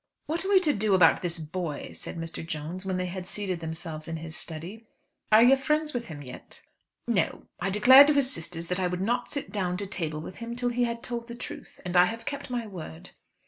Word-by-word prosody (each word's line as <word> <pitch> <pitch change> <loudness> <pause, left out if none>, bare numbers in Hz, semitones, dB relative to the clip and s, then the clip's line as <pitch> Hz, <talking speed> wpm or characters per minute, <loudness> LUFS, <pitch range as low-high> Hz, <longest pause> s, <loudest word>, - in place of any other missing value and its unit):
"What 330 +4 -1
are 385 - -3
we 395 -2 +7
to 305 -5 +3
do 205 -1 +3
about 170 -3 +5
this 175 -1 -1
boy?" 160 -1 -5
said - - -7
Mr. 165 -1 -4
Jones, 165 +4 -5
when 185 -1 0
they 185 - -1
had 180 0 -5
seated 190 -4 -2
themselves 160 -1 -5
in 165 0 -3
his 160 0 -5
study. 175 +9 -5 0.4
"Are 215 +2 +8
you 255 +3 +7
friends 300 +3 0
with 240 -1 -3
him 145 -3 -8
yet?" 125 -2 -11 0.4
"No; - - 0 0.2
I 195 - -1
declared 260 +8 +8
to 300 - +4
his 275 -2 +2
sisters 165 0 -3
that 180 +1 -1
I 185 - +1
would 180 0 -3
not 240 +5 -1
sit 285 - -2
down 180 -4 -1
to 200 - -4
table 165 -6 -3
with 160 +4 -8
him 235 0 -6
till 245 0 0
he 245 0 +1
had 235 0 -4
told 235 -1 -5
the 235 - -7
truth, 245 - -8
and 180 0 -3
I 180 0 +8
have 230 +4 -5
kept 280 -1 -5
my 245 -2 -2
word." 160 - -9
190 Hz, 235 wpm, -27 LUFS, 165-240 Hz, 0.4 s, Are